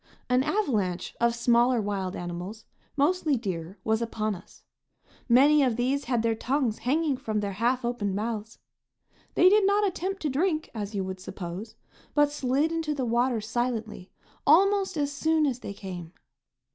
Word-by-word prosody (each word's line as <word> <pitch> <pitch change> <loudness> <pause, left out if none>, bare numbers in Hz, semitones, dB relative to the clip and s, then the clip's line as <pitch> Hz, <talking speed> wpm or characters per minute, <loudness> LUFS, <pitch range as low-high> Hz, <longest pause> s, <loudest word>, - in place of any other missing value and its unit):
An 250 +1 +4
avalanche 220 - -1
of 235 0 +3
smaller 240 +1 +3
wild 200 -3 -2
animals, 175 +5 -6 0.3
mostly 300 -1 +2
deer, 185 -4 -5
was 220 +1 +1
upon 215 -2 -1
us. 185 -1 -13 0.7
Many 285 +5 +6
of 255 -4 +2
these 260 +4 0
had 240 -2 0
their 230 -1 +2
tongues 245 0 -1
hanging 290 +1 +1
from 220 -5 -2
their 200 -1 -2
half 240 +5 0
opened 210 -5 -1
mouths. 220 +1 -4 0.8
They 360 - +6
did 415 +2 +6
not 410 +1 +3
attempt 385 0 -3
to 300 - +1
drink, 315 +2 0
as 210 -2 -5
you 195 - 0
would 190 0 -5
suppose, 185 +3 -7 0.4
but 295 -1 +4
slid 285 +2 0
into 325 -2 -1
the 265 -3 -1
water 240 0 +1
silently 225 -3 -3 0.4
almost 385 +3 +4
as 290 -1 0
soon 315 +2 +2
as 255 -4 -1
they 200 - -6
came. 180 -4 -8
240 Hz, 160 wpm, -27 LUFS, 210-295 Hz, 0.8 s, Many